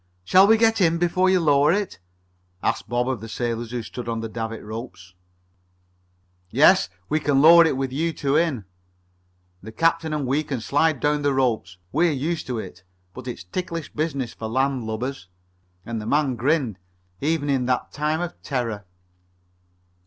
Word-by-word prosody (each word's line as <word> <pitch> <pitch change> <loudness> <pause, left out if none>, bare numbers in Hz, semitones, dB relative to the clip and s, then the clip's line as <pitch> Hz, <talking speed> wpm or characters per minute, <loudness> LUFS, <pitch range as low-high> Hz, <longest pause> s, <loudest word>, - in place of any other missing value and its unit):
"Shall 185 - +6
we 225 +1 +6
get 225 -1 +3
in 170 -2 +3
before 180 +2 +2
you 185 -1 +4
lower 145 -2 +4
it?" 200 - -2 0.6
asked - - -1
Bob 120 +1 0
of 130 -5 -2
the 115 - -8
sailors 115 0 -3
who 120 -1 -4
stood 120 +2 -7
at 115 -1 -2
the 115 - -4
davit 115 0 -5
ropes. 105 -5 -8 1.4
"Yes. - - +5 0.2
We 155 - +1
can 145 -3 +2
lower 165 +3 +8
it 140 - -1
with 135 -1 -2
you 165 +4 0
two 140 -3 -1
in. 150 - +1 1.0
The 110 - -9
captain 165 +6 +1
and 150 -2 -2
we 140 +4 +1
can 140 -4 -4
slide 145 +4 +1
down 150 0 +1
the 145 -1 +1
ropes. 110 -8 0
We're 165 +3 +2
used 155 +5 -3
to 125 -2 -3
it, 95 -4 -8 0.3
but 130 0 -9
it's 120 -9 -6
ticklish 165 - -5
business 145 -5 -2
for 110 - -6
land 130 +1 0
lubbers." 110 -1 -4 0.6
And 115 -1 -4
the 105 - -7
man 145 -1 +2
grinned 130 - 0 0.4
even 150 0 0
in 130 -3 0
that 125 -1 -1
time 155 +2 -1
of 175 -1 -6
terror. 115 -7 -3
135 Hz, 175 wpm, -23 LUFS, 115-160 Hz, 1.4 s, lower